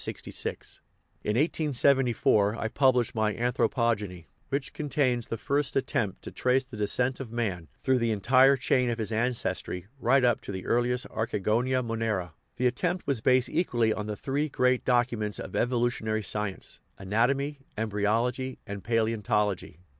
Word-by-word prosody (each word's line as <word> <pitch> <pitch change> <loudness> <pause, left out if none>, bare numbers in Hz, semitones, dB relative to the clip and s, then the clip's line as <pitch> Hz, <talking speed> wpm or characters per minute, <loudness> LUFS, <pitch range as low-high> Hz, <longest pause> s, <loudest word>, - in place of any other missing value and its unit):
In - - -2 1.2
1874 130 -8 +2
I 115 - -2
published 125 -2 +2
my 110 -2 0
Anthropogeny, 115 -6 0 0.2
which 140 0 -2
contains 130 -5 0
the 115 - -3
first 140 +5 -1
attempt 105 -7 -1
to - - -7
trace 130 +1 +1
the 130 -2 -11
descent 125 +5 0
of 130 -5 -7
man 100 -9 -2 0.2
through 130 -1 +3
the 115 -1 +1
entire 130 +6 +5
chain 125 0 +1
of 115 - -1
his 110 -1 -3
ancestry 110 -6 -1
right 135 -1 +3
up 120 -2 +3
to - - -7
the 95 -1 -6
earliest 120 +1 +1
archigonous 115 +4 0
monera; 110 -7 -2 0.2
the 125 - -1
attempt 175 +9 0
was 135 -6 0
based 130 +1 +3
equally 120 -10 +1
on 105 -1 -4
the 105 -1 -4
three 145 +3 -1
great 125 -1 +2
"documents" 120 -4 +1
of - - -7
evolutionary 120 -3 0
sci 105 +1 0
ence 95 - -5 0.2
anatomy, 135 +9 0 0.2
embryology, 115 +5 0
and 100 -1 -7
palaeontology. 105 -6 0
120 Hz, 145 wpm, -28 LUFS, 105-130 Hz, 1.2 s, entire